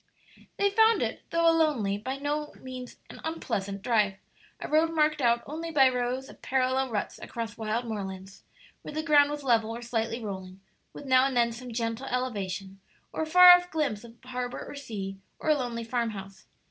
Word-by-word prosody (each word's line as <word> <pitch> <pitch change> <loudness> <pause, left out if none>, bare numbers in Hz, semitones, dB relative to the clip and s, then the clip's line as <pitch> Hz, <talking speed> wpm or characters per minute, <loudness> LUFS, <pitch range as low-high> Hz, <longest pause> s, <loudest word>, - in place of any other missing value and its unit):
They 400 0 +2
found 445 +2 +4
it, - - -3
though 335 0 +2
a 330 - +6
lonely, 275 -12 +1
by 260 +5 -4
no 295 +1 -3
means 255 -1 -8
an - - -12
unpleasant, 200 -12 -3
drive 210 -5 +2 0.4
a - - -5
road 315 +2 +3
marked 305 -1 +2
out 235 -1 +3
only 325 +3 -5
by 275 -5 +5
rows 250 +1 -2
of - - -15
parallel 260 0 +1
ruts 215 -3 -3
across 230 -2 -6
wild 225 +2 -2
moorlands, 195 -3 -6 0.4
where 300 - -9
the 310 - -1
ground 290 -2 +5
was 295 -1 -5
level 230 -4 +2
or 235 +1 -6
slightly 230 0 -2
rolling, 190 -4 -7 0.3
with - - -10
now 260 0 +5
and 265 -2 -2
then 235 -1 +3
some 245 +1 -8
gentle 230 +2 -3
elevation, 195 -7 -3 0.3
or - - -2
a 315 - -1
far 360 +2 +10
off 355 0 +6
glimpse 280 -11 -1
of 235 -1 -13
harbor 250 -1 -5
or - - -9
sea, 205 -9 -6 0.2
or 310 - 0
a - - +5
lonely 240 -4 -3
farmhouse. 225 -5 -4
250 Hz, 190 wpm, -28 LUFS, 220-295 Hz, 0.4 s, far